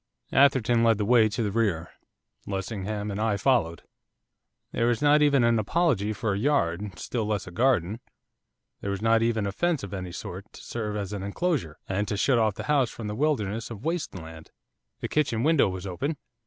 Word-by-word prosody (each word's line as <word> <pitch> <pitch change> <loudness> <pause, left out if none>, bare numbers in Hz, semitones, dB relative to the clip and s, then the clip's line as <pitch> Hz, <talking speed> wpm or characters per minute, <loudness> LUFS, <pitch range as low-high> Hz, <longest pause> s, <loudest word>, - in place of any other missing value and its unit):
Atherton 125 -4 +4
led 115 -2 +4
the 105 - -1
way 115 -1 +5
to 115 +2 -2
the 105 - -1
rear. 95 -7 0 0.6
Lessingham 100 +1 -3
and 100 - -4
I 110 -2 +1
followed. 95 - +1 0.9
There 115 - +1
was 120 -2 +1
not 150 +1 +4
even 140 -4 +4
an 115 -1 +3
apology 110 - +1
for 110 0 -1
a 100 - -2
yard, 105 - 0
still 115 -4 -3
less 105 -2 -1
a 90 - -9
garden, 110 -2 +1 0.8
there 100 - -4
was 100 +1 -3
not 115 0 +4
even 115 -2 +1
a 100 - -1
fence 170 - 0
of 100 - -7
any 90 -2 -5
sort, 95 +2 -8
to - - -12
serve 105 -3 -4
as 100 -1 -4
an 100 - -4
enclosure, 100 - -2
and 100 +2 -1
to 105 - -2
shut 125 +3 +3
off 110 -3 +2
the - - -5
house 140 -5 +2
from 115 - -8
the 105 - -4
wilderness 115 -6 -1
of 115 +1 -9
waste 165 - -2
land. 80 -2 -10 0.5
The - - -2
kitchen 135 -7 0
window 155 -8 +4
was 95 0 -6
open. 135 - -3
110 Hz, 200 wpm, -26 LUFS, 100-125 Hz, 0.9 s, way